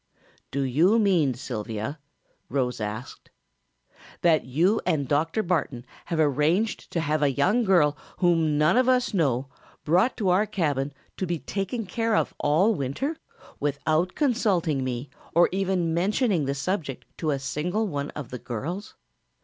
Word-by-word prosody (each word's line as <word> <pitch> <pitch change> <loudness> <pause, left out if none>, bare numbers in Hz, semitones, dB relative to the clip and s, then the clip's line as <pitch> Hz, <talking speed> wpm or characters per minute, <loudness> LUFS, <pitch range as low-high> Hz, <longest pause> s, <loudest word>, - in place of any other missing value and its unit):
"Do 140 +1 -1
you 160 - +3
mean, 175 - +3
Sylvia," 115 +3 -5 0.5
Rose 125 -4 -1
asked, 110 +4 -6 0.9
"that 165 -3 +4
you 170 - +2
and 155 -6 0
Dr. 160 - +1
Barton 145 -9 -1 0.2
have 165 - -2
arranged 155 - +1
to 170 - +1
have 155 0 0
a 145 - +4
young 190 - +2
girl 170 -8 +4 0.2
whom 165 -4 +2
none 155 +8 +4
of 255 0 +4
us 255 -2 +2
know 135 -8 +1 0.4
brought 180 - +2
to 200 -5 +1
our 195 +4 +3
cabin 145 -9 -1 0.3
to 185 - -2
be 170 0 -1
taken 200 +7 -3
care 225 +4 0
of - - +1
all 165 +10 +3
winter, 170 - -2 0.4
without 155 +5 0
consulting 195 - +1
me 130 +1 -4 0.2
or 175 - +6
even 185 -3 0
mentioning 190 - +1
the 140 +1 -1
subject 145 -2 -3
to 160 - -1
a 140 - +1
single 165 +10 -2
one 145 -7 -3
of 145 -6 -6
the 125 - -5
girls? 165 - -5
160 Hz, 150 wpm, -26 LUFS, 140-195 Hz, 0.9 s, or